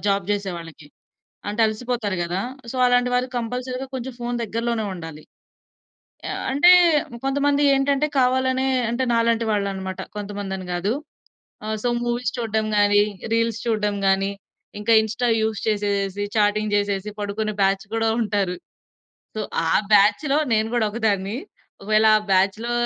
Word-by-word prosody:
Job 200 -2 +1
జేసే 200 -2 -1
వాళ్ళకి. 165 -3 -11 0.6
అంటే 210 +3 -2
అలసిపోతారు 220 -2 -2
గదా! 175 +2 -2 0.2
ఆహ్, 235 - -15
సో - - -6
అలాంటి 245 0 +3
వారు 250 +1 +1
కంపల్సరీగా 250 +2 -3
కొంచెం 260 0 -5
ఫోన్ 240 0 -2
దగ్గరలోనే 230 0 -2
ఉండాలి. 160 -3 -9 1.0
ఆహ్, - - -4
అంటే 290 +7 +6 0.5
కొంతమంది 285 +1 +1
ఏంటంటే 280 +2 +1
కావాలనే 260 +1 +2 0.2
అంటే 245 +2 0
నాలాంటి 230 0 +2
వాళ్ళు 200 -1 0
అన్నమాట. 190 -1 -5 0.2
కొంతమంది 205 -1 -5
అని 185 -1 -8
గాదు. 185 +5 0 0.7
ఆహ్, 215 0 -2
సో - - +3
మూవీస్ 240 +1 -1
చూడ్డం 220 -2 -1
గాని, 205 0 +5 0.3
రీల్స్ 230 -1 0
చూడ్డం 210 -3 0
గాని, 195 +1 +2 0.5
ఇంకా 230 +2 +3
ఇన్‌స్టా 220 +3 -2
యూజ్ 220 -2 -1
చేసేసి, 205 -2 -1
చాటింగ్ 210 0 +1
చేసేసి 200 0 -1
పడుకునే 210 +1 -2
బ్యాచ్ 195 0 +1
గూడా 225 0 +1
ఉంటారు. 205 -4 0 0.8
సో 215 - -2 0.3
ఆ - - +2 0.2
బ్యాచ్‌లో 210 +8 +4
నేను 220 0 +2
గూడా 240 -2 +2
ఒకదాన్ని. 205 -2 -1 0.5
ఒకవేళ 215 +2 +3
ఆ - - +4
బ్యాచ్‌లో 195 +5 +2
215 Hz, 140 wpm, -22 LUFS, 200-240 Hz, 1.0 s, అంటే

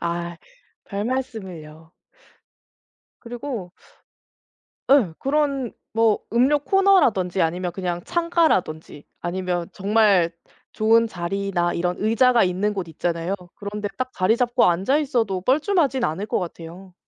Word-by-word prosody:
아. 170 0 -3 0.5
별말씀을요. 190 -9 -5 1.3
그리고 235 -6 -6 1.2
예. 225 - +5
그런 275 -3 0 0.2
뭐 225 -1 +3
음료 265 +5 +4
코너라든지 280 - +3
아니면 175 +2 -1
그냥 175 -2 -3
창가라든지 320 - 0 0.2
아니면 175 -1 -2
정말 200 -4 +3 0.4
좋은 225 +1 +3
자리나 175 -1 -2
이런 180 +1 -1
의자가 230 +2 +4
있는 190 +3 0
곳 190 -4 -4
있잖아요. 170 +3 -2 0.2
그런데 205 0 -5
딱 255 0 -3
자리 200 +5 +2
잡고 245 0 +2
앉아 190 +11 +2
있어도 225 -10 -1
뻘쭘하진 280 - +1
않을 165 +7 -3
것 - - 0
같아요. 175 +1 -8
200 Hz, 265 characters per minute, -23 LUFS, 175-250 Hz, 1.3 s, 예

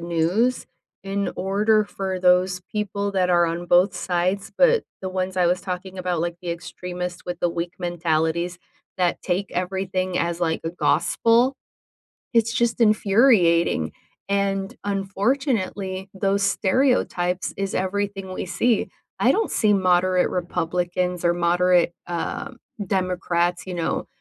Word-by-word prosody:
news 175 +9 0 0.4
in 200 0 -2
order 210 +3 +2
for 190 -2 -4
those 180 0 +3
people 205 -1 -2
that 185 -2 +1
are 175 -1 +4
on 170 +1 -3
both 175 +3 +4
sides, 185 +2 -1
but, 485 -2 +4 0.2
the 190 - -2
ones 185 0 -3
I 180 -1 +3
was 180 +2 +1
talking 185 0 -6
about, 180 -2 -1
like, 170 0 -2
the 175 -2 -4
extremists 180 +1 -6
with 175 0 -5
the 175 - +2
weak 170 +1 -4
mentalities, 170 0 -1 0.4
that 180 -2 0
take 190 +2 -1
everything 185 0 -2
as, 170 0 -1
like, 165 -2 0
a 165 - -1
gospel, 235 +8 +2 0.8
it's 230 -1 +3
just 235 0 0
infuriating, 200 - +4 0.4
and, 195 -1 -1
unfortunately, 195 -1 -1
those 200 +1 +1
stereotypes 195 -3 +1
is 195 0 -2
everything 195 0 -2
we 185 - -4
see. 235 +4 +1 0.3
I - - +4
don't 445 - 0
see 215 -2 +2
moderate 185 -1 +3
Republicans 180 0 -2
or 170 0 +3
moderate, 175 0 +3
um, 175 +8 -4 0.3
Democrats, 180 -2 0
you 185 - -5
know, 170 -2 -2
185 Hz, 135 wpm, -23 LUFS, 175-200 Hz, 0.8 s, are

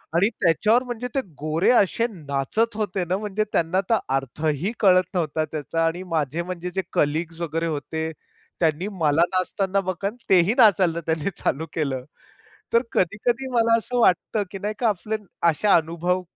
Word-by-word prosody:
आणि 195 +5 +4
त्याच्यावर 210 +9 +3
म्हणजे 245 -1 -5
ते 270 - +2 0.2
गोरे 155 +4 +1
असे 230 0 +3
नाचत 160 - -2
होते 205 -3 -1
ना 180 +2 0
म्हणजे 210 0 -1
त्यांना 175 +4 +1
तर 225 - +4 0.2
अर्थही 150 - -1
कळत 185 -3 +5
नव्हता 160 -3 0
त्याचा 155 +2 -2
आणि 175 +3 -1
माझे 155 +1 0
म्हणजे 180 0 -5
जे 190 - +1
कलीग्स 160 +3 0
वगैरे 165 0 -2
होते, 160 +1 -3 0.5
त्यांनी 165 +3 +1
मला 160 -4 +2
नाचताना 190 +1 0
बघून 200 +4 -3
तेही 190 +3 +5
नाचायला 190 -8 +5
त्यांनी 160 +2 0
चालू 160 +4 -1
केलं. 140 -5 -2 0.7
तर 230 - +5
कधी-कधी 235 +8 0
मला 230 -1 +4
असं 245 +2 -2
वाटतं 205 +1 +2
की 195 - -6
नाही 210 +2 -2
का 240 - +2
आपले 215 +2 -2 0.3
असे 165 +7 -1
अनुभव, 175 0 +2
180 Hz, 160 wpm, -23 LUFS, 160-210 Hz, 0.7 s, कळत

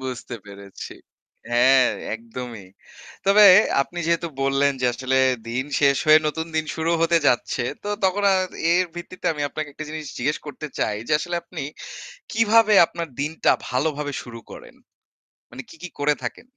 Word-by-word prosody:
বুঝতে 130 -2 -6
পেরেছি। 100 -1 -10 0.6
হ্যাঁ, 130 +1 +5 0.3
একদমই। 115 -2 -8 0.6
তবে 205 +2 +7 0.4
আপনি 175 +5 -9
যেহেতু 170 0 0
বললেন 135 +1 +2
যে 125 - +2
আসলে 130 +1 -1 0.3
দিন 125 +3 -2 0.2
শেষ 140 -1 +4
হয়ে 155 0 +8
নতুন 160 +2 -4
দিন 155 - +1
শুরু 160 +1 -1
হতে 170 +1 +3
যাচ্ছে। 120 -1 +1 0.2
তো 205 - -5 0.2
তখন 190 +2 +1
আর 185 - +2 0.3
এর 180 +1 +3
ভিত্তিতে 175 +1 -8
আমি 150 -2 -5
আপনাকে 155 +1 -5
একটা 155 - -7
জিনিস 155 0 -6
জিজ্ঞেস 145 +5 -1
করতে 145 +1 -7
চাই, 105 - 0
যে - - -1
আসলে 175 +3 -3
আপনি 170 -3 -8 0.7
কিভাবে 225 0 +4
আপনার 170 0 -6
দিনটা 155 +3 +1 0.2
ভালোভাবে 145 +2 -2
শুরু 120 -2 -10
করেন? - - -12 0.8
মানে 135 - -8
কি, - - -14
কি 180 - -6
করে 145 +1 +2
থাকেন। - - -6
150 Hz, 160 wpm, -23 LUFS, 130-170 Hz, 0.8 s, হয়ে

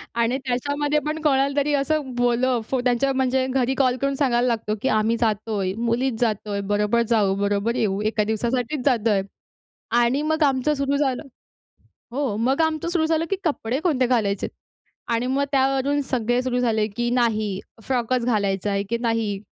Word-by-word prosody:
आणि 235 +2 +1
त्याच्यामध्ये 285 +4 0
पण 305 +1 -2
कोणाला 275 -2 +2
तरी 290 +1 0
असं 285 -1 0
बोललं 245 0 +1
फो 265 - 0
त्यांच्यावर, 255 +2 +1
म्हणजे 260 0 +1
घरी 260 0 +1
कॉल 255 -2 +2
करून 275 0 0
सांगायला 250 -3 +2
लागतो, 220 -2 -1
की - - 0
आम्ही 225 +2 +1
जातोय, 210 -3 0
मुलीच 235 +1 0
जातोय, 210 -3 -1
बरोबर 210 +3 +2
जाऊ, 205 -4 +3
बरोबर 205 +3 0
येऊ. 200 -3 0
एका 215 0 +1
दिवसासाठीच 245 +5 -2
जातोय. 225 -6 +2 0.7
आणि 240 +4 +2
मग 315 0 +2
आमचं 275 +1 +2
सुरु 280 0 0
झालं 270 -2 0 0.9
हो. 260 -6 -1
मग 260 +7 +1
आमचं 320 +1 0
सुरु 340 -2 +1
झालं, 325 0 +1
की 390 - +1
कपडे 265 -6 -1
कोणते 280 -8 +1
घालायचेत. 210 -6 0 0.6
आणि 235 +1 0
मग 270 +2 +1
त्यावरून 270 +1 +2
सगळे 245 0 +1
सुरू 250 -1 -1
झाले, 220 -3 +1
की 240 +3 -2
नाही 220 -5 +1 0.2
फ्रॉकच 250 0 0
घालायचा 205 -4 0
आहे, 200 0 0
की 235 - +1
नाही 225 -4 0
245 Hz, 165 wpm, -23 LUFS, 220-275 Hz, 0.9 s, जाऊ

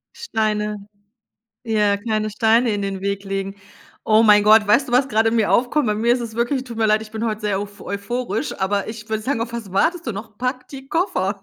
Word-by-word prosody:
Steine, 210 - -2 0.8
ja, 210 -3 +2
keine 215 0 -2
Steine 225 +2 +2
in 205 -1 -2
den 195 -1 -3
Weg 200 0 -3
legen. 195 0 -4 0.5
Oh 215 0 +4
mein 210 -2 +6
Gott, 215 0 +6
weißt 255 +7 +3
du, 245 - -6
was 260 +2 +3
gerade 225 0 +2
in 230 - 0
mir 215 -2 +2
aufkommt? 255 +2 +2
Bei 210 - +1
mir 230 +3 +2
ist 245 - 0
es 225 -2 -6
wirklich 255 +3 -1
tut 235 -2 -8
mir 220 - +2
leid, 215 0 +1
bin 220 +1 -3
heute 215 -1 -2
sehr 200 -2 0
uph 205 0 -8
euphorisch, 225 +4 -4
aber 200 +1 -1
ich 220 -1 -8
würde 220 0 -2
sagen: 255 -1 -1
„Auf 235 0 -3
was 220 -5 -6
wartest 325 - +1
du 230 - -2
noch? 215 +1 -9
Pack 250 0 -3
die 270 -1 -10
Koffer.“ 200 - -1
220 Hz, 225 wpm, -21 LUFS, 205-235 Hz, 0.8 s, mein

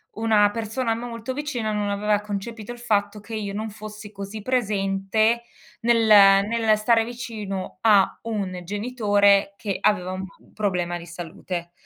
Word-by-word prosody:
una 215 -2 +3
persona 225 +2 -2
molto 230 +1 -5
vicina 255 -6 -3
non 205 -1 -1
aveva 205 +1 +1
concepito 210 +2 -6
il 240 - -8
fatto 205 -2 0
che 225 +2 -11
io 205 -2 -3
non 215 +1 -3
fossi 210 0 -9
così 200 +1 -7
presente 215 -1 +1 0.4
nel 230 -1 +3 0.4
nel 225 -1 +2
stare 225 +1 +3
vicino 220 -7 -6
a 205 -4 +4
un 195 -5 -3
genitore 205 -1 +2
che 200 -3 -3
aveva 185 -3 +1
un 190 0 -4 0.3
problema 180 -4 -1
di 170 - -10
salute. 170 +1 -6
210 Hz, 140 wpm, -24 LUFS, 200-225 Hz, 0.4 s, a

